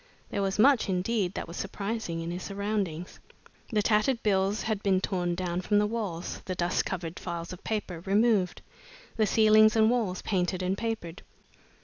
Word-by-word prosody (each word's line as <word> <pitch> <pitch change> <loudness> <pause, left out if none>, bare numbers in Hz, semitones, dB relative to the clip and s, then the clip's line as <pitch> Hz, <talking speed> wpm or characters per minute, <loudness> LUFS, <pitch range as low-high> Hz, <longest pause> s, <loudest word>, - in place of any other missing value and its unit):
There 200 - -1
was 195 -1 -1
much, 255 0 +5
indeed, 190 +1 0
that - - -4
was 170 - -8
surprising 200 -4 -3
in 165 +1 -4
his 180 +1 -4
surroundings. 200 -4 -3 0.5
The 210 -2 +2
tattered 225 +3 +2
bills 200 0 +1
had 220 -2 -1
been 195 -2 +2
torn 180 -2 -1
down 180 0 -2
from 205 +3 +1
the 210 - +4
walls, 210 -6 -4
the 185 - -3
dust 175 0 0
covered 175 -2 -4
files 170 -1 -5
of 180 - -11
papers 190 -5 -4
removed, 205 -2 +2 0.5
the 220 -2 +2
ceilings 215 0 +5
and 220 0 +5
walls 215 -7 -1
painted 185 -2 0
and 185 +1 0
papered. 215 -6 -4
195 Hz, 170 wpm, -28 LUFS, 180-215 Hz, 0.5 s, much